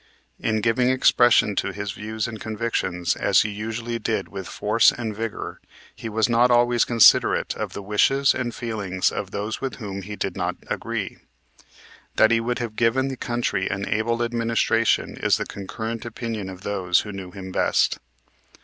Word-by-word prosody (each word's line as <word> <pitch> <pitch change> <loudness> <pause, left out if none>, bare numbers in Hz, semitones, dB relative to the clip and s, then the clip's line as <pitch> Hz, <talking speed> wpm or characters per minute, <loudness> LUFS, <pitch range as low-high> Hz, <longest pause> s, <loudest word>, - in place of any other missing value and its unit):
In 110 -1 0
giving 120 +3 +2
expression 120 -4 +4
to - - 0
his 100 +1 -4
views 110 +2 -4
and 110 -2 -8
convictions, 105 -6 -1
as - - +3
he 110 - -1
usually 115 +3 -4
did - - -2
with - - -7
force - - +3
and 110 -3 -5
vigor, 115 0 -5 0.3
he 115 - -6
was 110 +1 +1
not 120 +1 +4
always 120 -1 +4
considerate 115 -3 +4
of - - -4
the 100 - -6
wishes 135 +7 +3
and 125 -2 -2
feelings 105 -6 -1
of 100 - -4
those 105 +2 -4
with 135 -3 -3
whom 100 -4 -6
he 105 +2 -7
did 95 -3 -3
not 90 -1 -2
agree. - - -4 1.0
That 110 - +5
he 115 - +4
would 120 +2 -2
have 115 -3 -4
given 125 +4 +2
the 135 - -4
country 120 -6 -1
an 100 +1 -3
able 115 +3 0
administration 115 -1 +1
is - - +2
the - - -3
concurrent 110 +3 -6
opinion 115 -4 -5
of 95 -1 -9
those 95 -3 +1
who 105 - -7
knew 95 -2 -7
him 95 0 -8
best. - - +1
110 Hz, 175 wpm, -23 LUFS, 100-120 Hz, 1.0 s, That